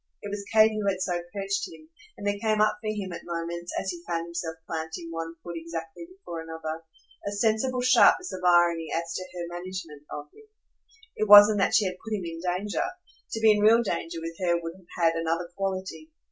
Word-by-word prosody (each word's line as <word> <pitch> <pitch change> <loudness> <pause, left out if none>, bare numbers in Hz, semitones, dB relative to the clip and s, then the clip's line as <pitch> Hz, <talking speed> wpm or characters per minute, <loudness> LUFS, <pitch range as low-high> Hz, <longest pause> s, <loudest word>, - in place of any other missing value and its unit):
It 205 - -5
was 200 0 -4
Kate 220 0 +6
who 210 -2 0
had 190 -1 -1
so 175 -2 -1
perched 195 0 -2
him, 155 -1 -14 0.3
and 205 - -8
there 205 0 0
came 215 -1 +1
up 215 0 +3
for 215 - -5
him 200 -4 -4
at - - -6
moments, 170 0 -4
as 190 - -2
he 175 -1 -8
found 170 -1 -1
himself 170 -1 -4
planting 160 +1 -5
one 165 0 -5
foot 175 - -6
exactly 165 - -6
before 365 - -8
another, 160 0 -6 0.5
a - - -1
sensible 225 +5 +1
sharpness 250 - +5
of 185 -1 -6
irony 175 -2 +4
as 165 0 -2
to 185 - -3
her 175 -1 -5
management 175 -5 -7
of 145 - -6
him. 435 - -18 0.7
It 215 - -1
wasn't 205 0 +10
that 195 - +3
she 215 - +4
had 185 -1 -3
put 220 - -4
him 185 - -6
in 165 0 -6
danger 185 - -1 0.5
to 225 - -1
be 220 -1 +7
in 210 - +3
real 225 +3 +6
danger 165 -5 -3
with 165 0 -6
her 175 -2 +2
would 165 0 -6
have 185 -2 -20 0.3
had - - -8
another 165 +1 -1
quality. 185 -5 -4
180 Hz, 215 wpm, -27 LUFS, 165-205 Hz, 0.7 s, wasn't